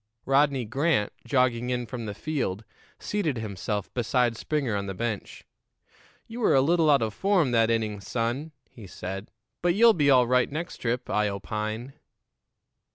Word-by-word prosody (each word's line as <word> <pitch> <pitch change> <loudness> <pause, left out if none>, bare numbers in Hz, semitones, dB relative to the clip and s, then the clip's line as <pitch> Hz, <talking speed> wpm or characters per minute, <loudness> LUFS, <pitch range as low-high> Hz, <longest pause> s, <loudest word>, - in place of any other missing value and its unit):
Rodney 135 -2 +2
Grant, 135 -2 0
jogging 125 -2 +1
in 125 -1 -1
from 115 0 -6
the 100 - -5
field, 120 -10 -3 0.3
seated 165 -11 -2
himself 105 -1 -4
beside 120 0 +1
Springer 135 -3 -1
on 100 0 -2
the 95 - -4
bench. 115 -1 -4 0.8
"You 230 +2 -8
were 225 - +3
a 135 - +6
little 165 +2 +3
out 140 -5 +5
of 110 -2 -2
form 190 - +2
that 115 -1 +3
inning, 110 -3 -1
son," 120 +9 -2 0.2
he 110 -5 -13
said; 95 +3 -6 0.3
"but 175 0 +2
you'll 230 +2 +7
be 145 -6 +2
all 130 -2 +6
right 125 +2 +2
next 165 +4 -5
trip, 125 +1 -2
I 105 0 +1
opine." 110 +5 -4
125 Hz, 160 wpm, -26 LUFS, 110-145 Hz, 0.8 s, you'll